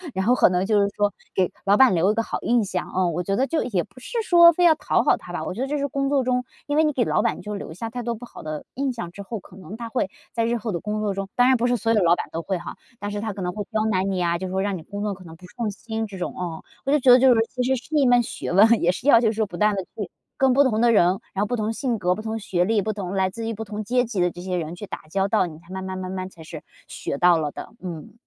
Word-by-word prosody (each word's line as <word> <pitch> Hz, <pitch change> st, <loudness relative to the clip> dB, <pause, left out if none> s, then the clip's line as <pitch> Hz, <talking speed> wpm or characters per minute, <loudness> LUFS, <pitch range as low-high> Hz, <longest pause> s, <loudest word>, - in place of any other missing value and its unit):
然 190 Hz, +1 st, 0 dB
后 245 Hz, -, +5 dB
可 -, -, +5 dB
能 180 Hz, +1 st, 0 dB
就 210 Hz, -1 st, +3 dB
是 200 Hz, -, +3 dB
说 205 Hz, -1 st, +1 dB, 0.2 s
给 185 Hz, -2 st, +2 dB
老 200 Hz, +1 st, +4 dB
板 260 Hz, -7 st, +6 dB
留 185 Hz, +5 st, +3 dB
一 -, -, -2 dB
个 230 Hz, -, +1 dB
好 -, -, -4 dB
印 235 Hz, -3 st, +2 dB
象。 185 Hz, -2 st, -3 dB
哦， 185 Hz, -1 st, +1 dB
我 175 Hz, +2 st, -2 dB
觉 195 Hz, +3 st, -1 dB
得 265 Hz, -, +2 dB
就 330 Hz, -, 0 dB
也 195 Hz, -8 st, 0 dB
不 210 Hz, +5 st, -17 dB
是 465 Hz, -, -6 dB
说 340 Hz, -1 st, +8 dB
非 355 Hz, +2 st, 0 dB
要 325 Hz, -, +7 dB
讨 -, -, +1 dB
好 -, -, +4 dB
他 -, -, -11 dB
吧， -, -, -4 dB
我 -, -, -3 dB
觉 240 Hz, -, -5 dB
得 270 Hz, -, -1 dB
这 295 Hz, +1 st, -1 dB
是 280 Hz, 0 st, -1 dB
工 275 Hz, 0 st, -1 dB
作 275 Hz, -2 st, +2 dB
中 250 Hz, 0 st, 0 dB, 0.2 s
因 290 Hz, -, -1 dB
为 315 Hz, -, +4 dB
你 305 Hz, -, +2 dB
给 250 Hz, -4 st, 0 dB
老 -, -, +2 dB
板 -, -, 0 dB
你 -, -, -9 dB
就 210 Hz, 0 st, -6 dB
留 200 Hz, -, -7 dB
下 225 Hz, +6 st, -5 dB
太 245 Hz, +1 st, -5 dB
多 235 Hz, 0 st, -2 dB
不 245 Hz, +3 st, -10 dB
好 -, -, -12 dB
的 155 Hz, -1 st, -5 dB
印 270 Hz, 0 st, -1 dB
象 175 Hz, -8 st, -6 dB
之 200 Hz, -, -9 dB
后， 210 Hz, +2 st, -5 dB
可 180 Hz, -, -17 dB
能 195 Hz, +3 st, -9 dB
他 235 Hz, -1 st, -6 dB
会 225 Hz, -6 st, -1 dB, 0.2 s
在 230 Hz, -, 0 dB
日 235 Hz, +1 st, 0 dB
后 220 Hz, -1 st, -4 dB
的 170 Hz, -, -2 dB
工 215 Hz, 0 st, -3 dB
作 205 Hz, -2 st, 0 dB
中 195 Hz, 0 st, -4 dB
当 245 Hz, +1 st, +5 dB
然 260 Hz, -, +5 dB
不 240 Hz, +1 st, +1 dB
是 245 Hz, 0 st, +2 dB
所 225 Hz, +2 st, +1 dB
有 210 Hz, -4 st, +3 dB
老 170 Hz, +1 st, +5 dB
板 -, -, -4 dB
都 165 Hz, -, -3 dB
会 185 Hz, +3 st, -2 dB
哈， 170 Hz, -, -8 dB, 0.2 s
但 205 Hz, 0 st, -4 dB
是 205 Hz, 0 st, -3 dB
他 220 Hz, -1 st, -2 dB
可 195 Hz, -1 st, -7 dB
能 180 Hz, -, -2 dB
会 205 Hz, -1 st, -4 dB
刁 215 Hz, 0 st, 0 dB
难 195 Hz, -2 st, +1 dB
你 185 Hz, -1 st, -1 dB
啊， 170 Hz, 0 st, +1 dB
就 185 Hz, -1 st, -4 dB
会 190 Hz, +1 st, -1 dB
让 200 Hz, -2 st, -1 dB
你 -, -, -9 dB
工 205 Hz, 0 st, -6 dB
作 205 Hz, -1 st, -1 dB
可 185 Hz, 0 st, -12 dB
能 165 Hz, -1 st, -11 dB
不 180 Hz, -, -14 dB
顺 220 Hz, +3 st, -4 dB
心 220 Hz, +2 st, -4 dB
这 195 Hz, -2 st, -9 dB
种 180 Hz, -, -4 dB
哦。 175 Hz, -3 st, -5 dB, 0.2 s
我 275 Hz, -, +1 dB
就 295 Hz, -, +4 dB
觉 255 Hz, -1 st, +6 dB
得 250 Hz, -, +8 dB
就 260 Hz, -1 st, +6 dB
是 -, -, +3 dB
其 250 Hz, -, -4 dB
实 265 Hz, +1 st, +2 dB
是 300 Hz, +5 st, -6 dB
一 280 Hz, -3 st, +4 dB
门 245 Hz, -1 st, +5 dB
学 -, -, -5 dB
问， 220 Hz, +5 st, +5 dB
也 175 Hz, -, +4 dB
是 245 Hz, +9 st, -6 dB
要 230 Hz, -5 st, +8 dB
去 220 Hz, -2 st, +3 dB
说 220 Hz, 0 st, 0 dB
不 175 Hz, -3 st, -9 dB
断 210 Hz, -1 st, +3 dB
地 190 Hz, -, -2 dB
去 195 Hz, -1 st, -7 dB, 0.3 s
跟 265 Hz, -1 st, +4 dB
不 280 Hz, +2 st, +5 dB
同 225 Hz, -4 st, +1 dB
的 240 Hz, -1 st, +5 dB
人， 205 Hz, -6 st, +5 dB, 0.3 s
然 195 Hz, -, -1 dB
后 -, -, +1 dB
不 245 Hz, -, -2 dB
同 215 Hz, 0 st, -1 dB
性 240 Hz, -3 st, -2 dB
格， 180 Hz, +1 st, +1 dB
不 215 Hz, -, -6 dB
同 220 Hz, 0 st, -3 dB
学 180 Hz, -3 st, 0 dB
历， 215 Hz, -1 st, +2 dB
不 215 Hz, +2 st, -2 dB
同 195 Hz, -2 st, -5 dB
来 190 Hz, -1 st, +1 dB
自 225 Hz, +3 st, -6 dB
于 230 Hz, -, -2 dB
不 220 Hz, +1 st, -5 dB
同 210 Hz, +1 st, -5 dB
阶 245 Hz, +3 st, +2 dB
级 215 Hz, -5 st, -4 dB
的 175 Hz, -1 st, +2 dB
这 175 Hz, -, -10 dB
些 185 Hz, 0 st, -3 dB
人 165 Hz, 0 st, -4 dB
去 200 Hz, +2 st, -8 dB
打 -, -, -7 dB
交 195 Hz, +2 st, +1 dB
道， 205 Hz, -3 st, +2 dB
你 160 Hz, -2 st, -9 dB
才 170 Hz, +1 st, -22 dB
慢 190 Hz, 0 st, -5 dB
慢 190 Hz, 0 st, -5 dB
慢 185 Hz, 0 st, -5 dB
慢 185 Hz, -1 st, -4 dB
才 170 Hz, -, -16 dB
是 160 Hz, -1 st, -9 dB, 0.2 s
学 140 Hz, -, -4 dB
到 175 Hz, 0 st, +5 dB
了 150 Hz, -2 st, -2 dB
的， -, -, -8 dB
嗯。 170 Hz, 0 st, -7 dB
210 Hz, 365 characters per minute, -23 LUFS, 185-240 Hz, 0.3 s, 说